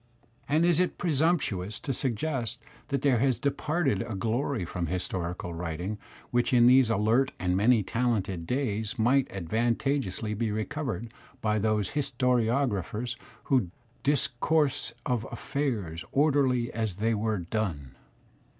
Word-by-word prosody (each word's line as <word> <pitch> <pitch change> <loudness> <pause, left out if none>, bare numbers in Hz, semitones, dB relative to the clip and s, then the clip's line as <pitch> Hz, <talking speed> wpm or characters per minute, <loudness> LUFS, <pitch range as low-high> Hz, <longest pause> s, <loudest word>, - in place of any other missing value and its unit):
And 155 +4 +3
is 175 -2 +3
it 180 - +1
presumptuous 145 - +1
to 135 - -2
suggest 120 -1 -1 0.3
that 140 -2 -2
there 135 -5 +4
has 130 0 +2
departed 140 - 0
a 110 - -4
glory 115 +1 -1
from 85 0 -3
historical 90 0 -3
writing 90 +5 -4 0.3
which 120 +1 +1
in 120 -1 +6
these 125 -1 +6
alert 115 +5 +2
and 90 0 0
many 110 +3 +4
talented 100 -7 -1
days 110 -2 -1
might 125 +4 +3
advantageously 110 - -1
be 110 +1 -1
recovered 115 +1 -3 0.3
by 110 -2 +1
those 105 -2 +1
historiographers 125 - 0 0.3
who 125 -10 +2 0.3
"discourse 140 -1 +1
of 120 -3 -1
affairs 105 - -3
orderly 135 -5 +2
as 110 -4 -2
they 110 +4 +1
were 110 0 0
done?' 85 - -3
115 Hz, 125 wpm, -28 LUFS, 105-135 Hz, 0.3 s, in